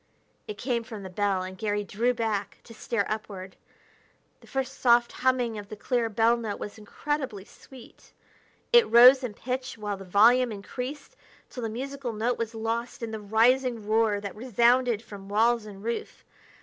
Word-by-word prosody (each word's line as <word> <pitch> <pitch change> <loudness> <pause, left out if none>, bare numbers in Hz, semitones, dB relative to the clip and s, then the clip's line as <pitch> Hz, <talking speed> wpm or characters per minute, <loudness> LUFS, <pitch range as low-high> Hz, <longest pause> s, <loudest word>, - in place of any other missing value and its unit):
It 425 - -6
came 240 -2 -1
from 220 -3 -9
the 190 - -8
bell, 195 -1 0
and 185 0 -7
Garry 205 0 -2
drew 230 +5 0
back 220 -4 -2
to 230 - -13
stare 220 -1 -2
upward. 195 -3 -6 0.8
The - - -19
first 270 0 -4
soft 240 -1 +4
humming 250 -4 0
of 205 0 -10
the 215 - -7
clear 235 +2 -1
bell 225 +2 +3
note 220 -3 -5
was 210 - -7
incredibly 250 -1 -4
sweet. 255 +1 -16 0.6
It 475 -1 +6
rose 250 +4 +8
in 225 -5 -4
pitch 255 +2 -4
while 205 -2 -4
the 195 - -9
volume 230 +6 +4
increased, 250 +7 -7 0.4
till 250 - -7
the 225 - -2
musical 265 +1 -5
note 230 +3 -1
was 230 0 -3
lost 230 +2 -3
in 225 - -4
the 220 -1 -5
rising 230 +2 +2
roar 215 -1 +2
that 200 -1 -6
resounded 240 0 +2
from 200 -3 -11
walls 225 +1 +2
and 200 -1 -11
roof. 235 +1 -5
230 Hz, 175 wpm, -27 LUFS, 205-250 Hz, 0.8 s, rose